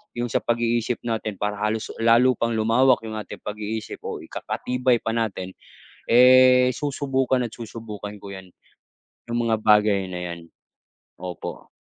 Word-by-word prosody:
'yong 120 -1 -3
sa - - +2
pag-iisip 120 0 0
natin 110 -3 -3
para 105 +1 -3
halos 105 +1 -2
lalo 115 +3 +5
pang 115 0 0
lumawak 115 +3 +3
'yong 110 -1 -5
ating 105 - -9
pag-iisip 105 +1 -5
o - - -5
ikakatibay 125 0 -1
pa 115 - -2
natin, 110 -5 -2 0.6
eh, 125 +1 +7
susubukan 135 -2 0
at 115 - -11
susubukan 110 -3 -8
ko 100 - -9
'yan, 95 -1 -12 0.8
'yong 120 0 -1
mga 110 - +3
bagay 105 -2 +3
na 90 -1 -5
'yan. 85 - -8 0.8
Opo 90 -1 -7
115 Hz, 140 wpm, -23 LUFS, 105-125 Hz, 0.8 s, eh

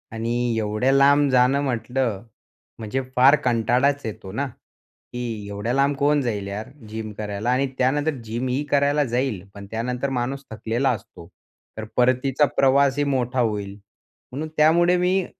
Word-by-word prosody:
आणि 115 +1 -2 0.3
एवढ्या 110 +5 0
लांब 140 +1 +5
जाणं 130 +2 +3
म्हटलं 125 -4 -2 0.6
म्हणजे 115 +4 -2
फार 135 +4 +7
कंटाळाच 125 +4 +2
येतो 100 -3 -7
ना? 140 +7 -2 0.7
की 115 -4 -5
एवढ्या 105 +4 -3
लांब 140 +1 +2
कोण 145 +1 +2
जाईल 105 -5 -3
यार 105 +4 -5 0.2
जिम 110 0 -5
करायला? 105 +2 -3
आणि 135 +2 +1
त्यानंतर 145 +4 +1
जिम 115 +3 -3
ही 135 +4 -1
करायला 145 +1 +3
जाईल 125 -6 0
पण 100 0 -10
त्यानंतर 125 +4 -2
माणूस 135 +3 -3
थकलेला 115 +4 -1
असतो, 95 -7 -6 0.5
तर 110 - -4
परतीचा 130 +3 +3
प्रवासही 140 +1 +3
मोठा 130 -2 -1
होईल. 105 -4 -1 0.6
म्हणून 150 +5 -4
त्यामुळे 170 +4 +4
मी 180 +1 +1
125 Hz, 145 wpm, -23 LUFS, 110-140 Hz, 0.7 s, फार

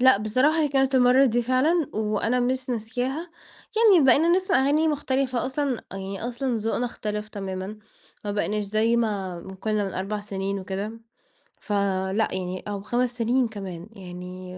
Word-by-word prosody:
لأ 260 -3 +7
بصراحة 255 +10 +2
هي 295 - +2
كانت 270 -1 +2
المرّة 255 +1 +6
دي 240 0 +1
فعلًا، 275 +6 +2
وأنا 215 +3 0
مش 255 +1 -1
ناسياها. 250 +8 -3 0.5
يعني 410 -10 +6
بقينا 290 +6 +5
نسمع 370 -2 +3
أغاني 305 +3 +3
مختلفة 265 -4 0
أصلًا، 265 -2 -1
يعني 195 +2 -5
أصلًا 250 0 -1
ذوقنا 225 +3 -1
اختلف 210 -2 -4
تمامًا، 195 +1 -5 0.5
ما 205 - -2
بقيناش 210 0 -1
زي 220 +3 +2
ما 195 -6 -1
ما 190 +2 -9
كنّا 210 +1 -1
من 195 - -4
4 200 +3 -2
سنين 195 -1 -3
وكده، 195 +3 -4 0.7
فلأ 200 0 0
يعني 185 0 -4
أو 200 -1 -3
5 245 +3 -1
سنين 240 +2 +2
كمان، 195 -4 -7
يعني 180 -1 -8
220 Hz, 155 wpm, -25 LUFS, 195-260 Hz, 0.7 s, لأ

